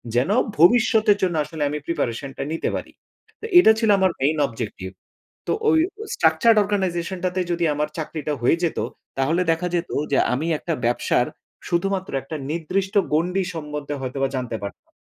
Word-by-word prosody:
যেন 125 +8 +2 0.3
ভবিষ্যতের 220 +3 +5
জন্য 180 -3 +1
আসলে 150 0 -4
আমি 150 - -3
প্রিপারেশনটা 135 -4 -3
নিতে 165 - -1
পারি। - - -6 0.5
তে - - -6
এটা 220 - +7
ছিল 225 -2 +1
আমার 190 -1 +3
মেইন 150 +4 +2
অবজেক্টিভ। 110 -6 -6 0.6
তো - - 0 0.2
ওই 320 - +5 0.4
structured 230 -2 +4
organization 190 -3 -1
টা 185 - +3
তে - - +2
যদি 170 0 0
আমার 150 +1 -1
চাকরিটা 155 -1 -3
হয়ে 145 - +4
যেত, 165 - -1 0.4
তাহলে 160 +7 +2
দেখা 165 +2 -2
যেত 175 0 -1 0.2
যে - - +4 0.2
আমি 145 +6 -2
একটা 165 - -3
ব্যবসার 120 - +1 0.4
শুধুমাত্র 190 +2 -1
একটা 155 +4 -6
নির্দিষ্ট 185 +5 -2 0.2
গণ্ডি 180 +5 +1
সম্বন্ধে 150 -2 -5
হয়তোবা 135 +1 -2
জানতে 125 -3 -3
পারতাম। 100 - -9
165 Hz, 160 wpm, -22 LUFS, 140-190 Hz, 0.6 s, এটা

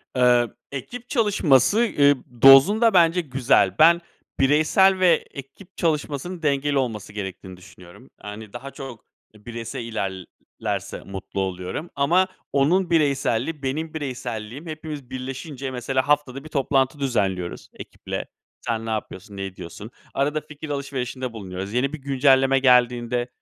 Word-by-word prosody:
Eee, 125 -1 +4 0.2
ekip 240 - -7
çalışması, 205 - +3 0.2
ıııı, 145 0 +6 0.3
dozunda 195 - +7
bence 175 0 +4
güzel. 130 - +2
Ben 170 +2 +6 0.4
bireysel 155 +7 +4
ve 175 -4 +4
ekip 155 +8 -12
çalışmasının 160 +2 -2
dengeli 145 -1 +1
olması 110 -6 -3
gerektiğini 95 -2 -7
düşünüyorum. 90 +6 -16
Yani 105 0 -9
daha 130 +3 -8
çok 135 -5 -10 0.3
bireysel 115 +4 -7
ilerlerse 95 -5 -5
mutlu 95 0 -6
oluyorum 95 - -4
ama 170 +7 +3 0.3
onun 165 +7 +2
bireyselliği 145 -2 +1
benim 155 +4 -3
bireyselliğim 125 -2 -5
hepimiz 155 -4 -7
birleşince 135 +1 -6
mesela 130 +1 -1
haftada 145 -2 0
1 155 - -11
toplantı 135 0 +1
düzenliyoruz 100 -9 -2
ekiple. - - -7 0.4
Sen 115 -2 -3
ne - - -4
yapıyorsun, 105 -2 -5
ne 95 - -3
ediyorsun? 95 +3 -9 0.2
Arada 145 +2 0
fikir 150 +1 -10
alışverişinde 130 -3 -4
bulunuyoruz. 95 -2 -6
Yeni 130 +4 0
bir - - -3
güncelleme 135 0 +3
geldiğinde, 125 -2 +3
135 Hz, 125 wpm, -23 LUFS, 115-150 Hz, 0.4 s, dozunda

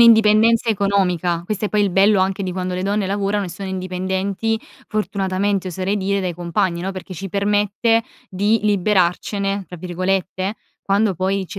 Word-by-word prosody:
'indipendenza 225 0 +6
economica, 185 -5 +1
questo 210 +2 -3
è - - 0
poi 210 - +1
il 200 - +1
bello 195 +2 +4
anche 190 +1 0
di 185 - -3
quando 185 0 -3
le 185 - -2
donne 205 +1 0
lavorano 200 +1 0
e - - -6
sono 190 +3 -6
indipendenti, 190 +4 -2 0.3
fortunatamente 195 -2 -1
oserei 185 +3 -1
dire, 200 0 0
dai 180 -3 -2
compagni, 175 +1 -1
no, 190 +1 -2
perché 185 0 -8
ci 195 +3 -6
permette 205 +3 +1 0.2
di 205 +4 +1
"liberarcene" 200 0 +1
tra 180 - -9
virgolette, 185 +2 -2 0.3
quando 200 0 +2
poi 190 +2 -1
ci 195 - -7
195 Hz, 165 wpm, -20 LUFS, 185-205 Hz, 0.3 s, indipendenza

